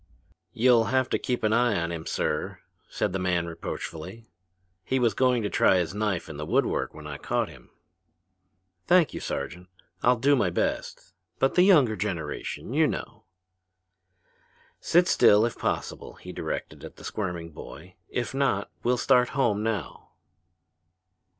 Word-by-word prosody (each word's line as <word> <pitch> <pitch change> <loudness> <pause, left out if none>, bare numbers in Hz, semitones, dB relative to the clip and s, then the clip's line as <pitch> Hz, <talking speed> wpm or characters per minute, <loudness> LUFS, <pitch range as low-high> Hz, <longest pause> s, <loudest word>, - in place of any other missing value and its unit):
"You'll 120 -1 +4
have 130 +1 +1
to - - 0
keep 125 -2 -2
an 110 0 +2
eye 120 -4 +3
on 85 0 -2
him, 80 -1 -6
sir," - - -2 0.3
said - - -2
the 95 - -1
man 90 -2 0
reproachfully. 85 +4 -7 0.6
"He 130 - 0
was 120 -4 +2
going 125 0 +2
to 105 - -1
try 95 - +4
his 90 0 -1
knife 105 -4 -1
on 75 - -8
the 75 - -4
wood - - +3
work - - -2
when 75 - -10
I 75 -2 -6
caught - - -1
him." - - -15 1.2
"Thank 175 -3 +4
you, - - -4
Sergeant. 85 +6 -5 0.3
I'll 125 +1 +4
do 140 +5 +3
my 100 -8 +2
best 90 +1 -3 0.2
but 135 - +2
the 180 - +4
younger 150 - +5
generation, 90 -7 -4
you - - +4
know." - - -6 1.5
"Sit 175 +2 +3
still, 105 - +5
if 120 - -3
possible!" - - -3
he - - -10
directed - - -5
the - - -11
squirming 90 -5 -4
boy. 90 +4 -11 0.2
"If 120 +1 -3
not, 135 -7 0
we'll 125 +1 +1
start 125 0 +3
home 110 -6 +2
now." 110 -1 -4
110 Hz, 155 wpm, -26 LUFS, 90-125 Hz, 1.5 s, younger